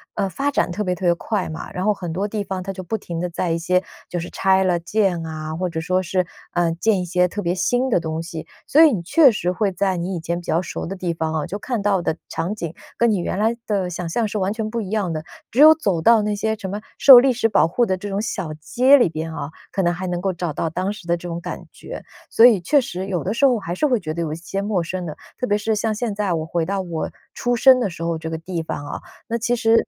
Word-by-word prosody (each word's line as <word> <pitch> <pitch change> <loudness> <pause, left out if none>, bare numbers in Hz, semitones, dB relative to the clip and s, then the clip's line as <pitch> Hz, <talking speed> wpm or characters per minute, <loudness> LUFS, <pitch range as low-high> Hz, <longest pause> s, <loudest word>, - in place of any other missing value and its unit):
呃， 195 - 0
发 280 +8 -1
展 285 - +1
特 200 +5 -2
别 180 - 0
特 180 +1 -5
别 175 - +5
快 200 +2 -2
嘛， 160 - -7
然 185 +2 -3
后 210 - +4
很 175 -4 -6
多 195 +5 -1
地 210 0 -3
方 190 -2 -4
它 195 +1 -5
就 185 0 -7
不 220 +5 -2
停 170 -3 -5
地 180 - -2
在 170 +1 -2
一 165 - +1
些 180 +2 +1 0.3
就 175 - -2
是 170 - -6
拆 190 0 +2
了 180 -2 +2
建 175 -1 0
啊， 155 0 -5
或 180 +2 -2
者 165 -1 -4
说 185 +3 0
是， 185 0 0 0.2
呃， 175 -1 +1
建 200 +3 +1
一 - - -3
些 180 +1 +2
特 205 - -4
别 175 -1 0
新 245 +7 +1
的 230 - +3
东 160 0 -3
西。 165 -2 -7 0.2
所 310 +4 +6
以 315 - +7
你 200 -8 -1
确 280 - +6
实 180 -5 -2
会 200 +1 0
在 190 0 0
你 180 +2 -3
以 - - -4
前 170 +1 -3
比 - - -18
较 165 - +1
熟 170 - -5
的 195 +3 -5
地 175 -2 -2
方 160 -1 -2
啊， 155 -2 -1
就 205 - -5
看 240 0 -3
到 200 -2 +2
的 160 - -1
场 170 +5 -3
景 170 -6 -5 0.2
跟 235 0 +3
你 205 - +1
原 180 +2 -2
来 225 +2 +2
的 195 -4 -1
想 175 -1 -4
象 225 +5 0
是 210 - -4
完 190 0 0
全 220 0 -3
不 230 +1 -2
一 195 - -6
样 200 -5 -1
的， 155 0 -4 0.3
只 250 - -3
有 310 +1 +10
走 195 - 0
到 225 +4 +5
那 210 0 -1
些 220 +1 -1
什 195 -3 -6
么 205 +2 -4 0.2
受 255 -3 +10
历 270 - +3
史 230 -2 +1
保 195 -7 +4
护 240 +7 +2
的 190 - 0
这 205 +2 -6
种 200 +1 -1
小 165 -7 -3
街 255 - +5
里 240 - +4
边 160 0 -4
啊， 145 -2 -4 0.2
可 195 - 0
能 175 - +2
还 185 +1 -5
能 175 0 -2
够 190 -1 0
找 175 -2 -3
到 160 - -2
当 185 +4 -1
时 195 -5 -10
的 170 - +2
这 175 +1 -7
种 170 0 -4
感 - - -6
觉。 - - -9 0.3
所 230 - +6
以 225 -6 +7
确 285 - +3
实 190 -5 -5
有 180 -3 -2
的 195 - -1
时 275 +4 +3
候 250 -3 +4
还 175 -3 -5
是 300 - +1
会 245 -5 +2
觉 155 - -4
得 170 - -3
有 155 -2 -2
一 - - -3
些 185 +4 -4
陌 200 -4 0
生 180 +1 -4
的， 155 - -6 0.2
特 250 - 0
别 205 - +2
是 220 +1 0
像 215 +1 0
现 225 -1 -2
在 200 -3 -1
我 160 -1 -2
回 165 0 -1
到 195 +2 -1
我 170 -3 -4 0.2
出 245 0 0
生 260 +2 +6
的 235 - 0
时 170 -1 -7
候 165 -1 -1
这 160 0 -6
个 160 - -3
地 170 0 -4
方 145 -2 -5
啊， - - -5 0.3
那 235 - -1
其 235 +2 0
实， 230 -1 +3
185 Hz, 315 characters per minute, -21 LUFS, 170-215 Hz, 0.3 s, 有